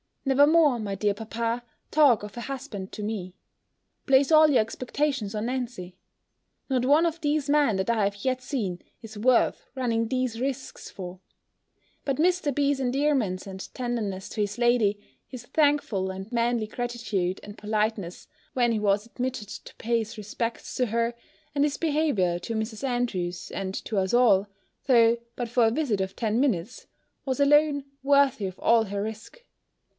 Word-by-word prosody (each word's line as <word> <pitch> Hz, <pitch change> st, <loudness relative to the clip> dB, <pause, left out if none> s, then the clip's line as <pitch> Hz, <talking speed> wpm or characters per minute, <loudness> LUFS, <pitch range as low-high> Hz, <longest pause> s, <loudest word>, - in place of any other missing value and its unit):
Never 275 Hz, +2 st, +5 dB
more, 305 Hz, -6 st, +4 dB
my 205 Hz, -2 st, -3 dB
dear 205 Hz, +1 st, +1 dB
papa, 230 Hz, +2 st, -3 dB, 0.3 s
talk 285 Hz, -9 st, +5 dB
of 210 Hz, +3 st, -9 dB
a -, -, -4 dB
husband 245 Hz, -8 st, -6 dB
to 210 Hz, -, -5 dB
me. 195 Hz, -4 st, -4 dB, 0.7 s
Place 275 Hz, +1 st, +4 dB
all 310 Hz, 0 st, +7 dB
your 265 Hz, -6 st, +5 dB
expectations 250 Hz, 0 st, -2 dB
on 215 Hz, +2 st, -2 dB
Nancy! 240 Hz, -8 st, -4 dB, 0.7 s
Not 255 Hz, -2 st, +1 dB
one 295 Hz, +5 st, +5 dB
of 335 Hz, 0 st, -2 dB
these 295 Hz, -1 st, 0 dB
men 290 Hz, -7 st, +3 dB
that 190 Hz, +3 st, -1 dB
I 225 Hz, -3 st, +2 dB
have 200 Hz, 0 st, -3 dB
yet 255 Hz, -1 st, 0 dB
seen, 210 Hz, -10 st, -3 dB, 0.2 s
is 220 Hz, -1 st, -9 dB
worth 245 Hz, +3 st, +2 dB
running 230 Hz, -3 st, 0 dB
these 255 Hz, -2 st, -1 dB
risques 265 Hz, +1 st, -4 dB
for! 180 Hz, -1 st, -8 dB, 0.9 s
But 275 Hz, -2 st, 0 dB
Mr. 345 Hz, -3 st, +2 dB
B.'s 285 Hz, 0 st, +1 dB
endearments 260 Hz, -7 st, 0 dB
and 190 Hz, -1 st, -8 dB
tenderness 220 Hz, -6 st, -3 dB
to 215 Hz, -, -3 dB
his 205 Hz, +1 st, -2 dB
lady, 240 Hz, -4 st, +2 dB, 0.3 s
his 250 Hz, -2 st, -9 dB
thankful 285 Hz, -11 st, +1 dB
and 190 Hz, +4 st, -8 dB
manly 235 Hz, -2 st, +1 dB
gratitude 220 Hz, -6 st, -2 dB
and 205 Hz, 0 st, -10 dB
politeness, 210 Hz, -4 st, -2 dB, 0.3 s
when 240 Hz, -2 st, +2 dB
he 220 Hz, -, 0 dB
was 205 Hz, 0 st, +1 dB
admitted 245 Hz, -3 st, -4 dB
to -, -, -10 dB
pay 235 Hz, +1 st, 0 dB
his 220 Hz, 0 st, -6 dB
respects 225 Hz, +3 st, -4 dB
to 250 Hz, -, +1 dB
her, 230 Hz, +2 st, 0 dB, 0.4 s
and 285 Hz, 0 st, +2 dB
his 290 Hz, -1 st, 0 dB
behaviour 285 Hz, -, +1 dB
to 225 Hz, +5 st, -5 dB
Mrs. 220 Hz, +2 st, -4 dB
Andrews, 210 Hz, -9 st, -2 dB
and 190 Hz, -1 st, -4 dB
to 215 Hz, -, -3 dB
us 190 Hz, +1 st, 0 dB
all, 210 Hz, -5 st, +5 dB, 0.4 s
though 235 Hz, -3 st, +5 dB, 0.2 s
but 240 Hz, -2 st, -4 dB
for 240 Hz, 0 st, +3 dB
a 225 Hz, -, +3 dB
visit 235 Hz, -7 st, 0 dB
of 190 Hz, 0 st, -3 dB
ten 220 Hz, 0 st, 0 dB
minutes, 240 Hz, -5 st, -1 dB, 0.4 s
was 265 Hz, 0 st, -2 dB
alone 285 Hz, 0 st, +4 dB, 0.2 s
worthy 275 Hz, -5 st, +3 dB
of 185 Hz, -1 st, -5 dB
all 230 Hz, -1 st, +4 dB
her 200 Hz, 0 st, -3 dB
risque. 220 Hz, -, -8 dB
235 Hz, 170 wpm, -26 LUFS, 205-270 Hz, 0.9 s, all